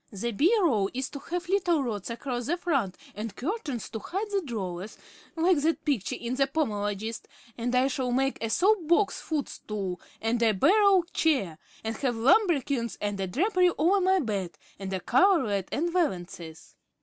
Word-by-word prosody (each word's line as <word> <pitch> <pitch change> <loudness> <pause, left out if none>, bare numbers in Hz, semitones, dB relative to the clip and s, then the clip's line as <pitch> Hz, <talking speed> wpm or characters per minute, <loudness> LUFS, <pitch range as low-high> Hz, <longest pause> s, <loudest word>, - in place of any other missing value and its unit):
The 235 +3 -3
bureau 295 - +3
is 260 0 -2
to 280 - -7
have 350 +4 -4
little 355 -5 +2
rods 210 -5 -4
across 240 +1 -4
the 340 +4 0
front 275 - -1 0.2
and 215 +1 -6
curtains 290 - -3
to 220 - -5
hide 400 - -4
the 400 -1 +1
drawers, 195 - -5 0.4
like 335 0 +3
that 320 +2 0
picture 275 - 0
in 240 +1 -4
the 275 +1 +2
'Pomologist,' 220 -6 -2 0.3
and 245 +1 -2
I 255 +1 +4
shall 255 -2 -2
make 270 +2 0
a 225 - -1
soapbox 380 - +2
footstool 210 - -4 0.2
and 230 +2 0
a 225 -2 +4
barrel 385 - +5
chair, 200 - +1 0.2
and 225 0 -3
have 255 -4 -1
lambrequins 275 - +2
and 205 -1 -2
a 190 - -1
drapery 365 - +2
over 375 +6 +3
my 375 +1 +4
bed, 200 - -3 0.2
and 195 -1 -5
a 190 - -1
coverlet 240 - +2
and 335 +3 -1
valances. 175 - -3
260 Hz, 165 wpm, -27 LUFS, 210-345 Hz, 0.4 s, barrel